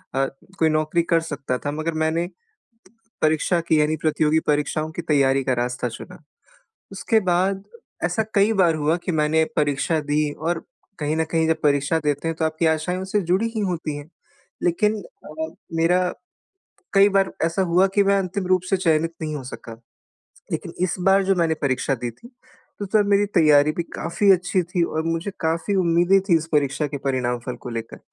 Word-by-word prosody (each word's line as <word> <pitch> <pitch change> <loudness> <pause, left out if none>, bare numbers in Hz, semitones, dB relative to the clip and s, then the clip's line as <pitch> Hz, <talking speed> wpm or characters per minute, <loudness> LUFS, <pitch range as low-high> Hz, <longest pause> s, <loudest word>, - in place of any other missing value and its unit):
अ, 135 0 +2 0.3
कोई 160 -1 +4
नौकरी 155 +2 +1
कर 170 -1 +2
सकता 140 -5 -3
था 145 - -4
मगर 155 +2 -3
मैंने 165 +2 0 1.0
परीक्षा 155 +3 +2
की 155 -1 +4
यानी 155 +1 +1
प्रतियोगी 155 0 +2
परीक्षाओं 150 +1 0
की 170 - -5
तैयारी 135 -3 +2
का 130 - +1
रास्ता 125 0 -2
चुना। 115 - -10 0.7
उसके 220 +3 +1
बाद 190 +2 +1 0.4
ऐसा 220 - +1
कई 205 +2 +4
बार 165 -2 +3
हुआ 155 +2 +1
कि 180 - 0
मैंने 160 +1 +2
परीक्षा 145 +2 +1
दी 150 0 +1
और 165 +2 -3 0.4
कहीं 150 +2 -1
न 160 - +1
कहीं 160 -1 +2
जब 160 0 +1
परीक्षा 145 +2 +2
देते 145 +2 0
हैं 165 - -1
तो 160 - -1
आपकी 160 +1 0
आशाएँ 160 +3 0
उससे 195 +2 0
जुड़ी 225 +5 +2
ही - - 0
होती 155 -4 -3
हैं। 145 +3 -10 0.5
लेकिन 210 +4 +1 0.3
अ, 160 +1 -5 0.2
मेरा 175 +3 +3 0.9
कई 200 +1 +6
बार 195 -1 +2
ऐसा 170 +4 0
हुआ 190 +2 +5
कि 200 - +5
मैं 200 0 +3
अंतिम 190 +1 -3
रूप 185 -1 +3
से 195 - +2
चयनित 165 -2 +1
नहीं 155 -1 -3
हो 135 - -5
सका 115 -2 -9 0.7
लेकिन - - -4
इस 185 - -1
बार 195 +1 +5
जो 195 0 +2
मैंने 165 -2 +2
परीक्षा 135 0 0
दी 120 -1 -4
थी, 235 - -16 0.5
तो 205 - -4
तब 205 +1 +2
मेरी 200 +1 +4
तैयारी 150 -2 +5
भी 170 - -2
काफ़ी 195 +4 +1
अच्छी 180 0 +1
थी 175 0 -2
और 160 -1 -2
मुझे 165 +4 -2
काफ़ी 165 +5 -1
उम्मीदें 175 +2 +3
थी 170 - +5
इस 160 0 -2
परीक्षा 145 0 +1
के 140 0 -5
परिणाम 125 -2 0
फल 125 - -4
को - - -7
लेकर। 115 -1 -6
160 Hz, 190 wpm, -22 LUFS, 150-180 Hz, 1.0 s, कई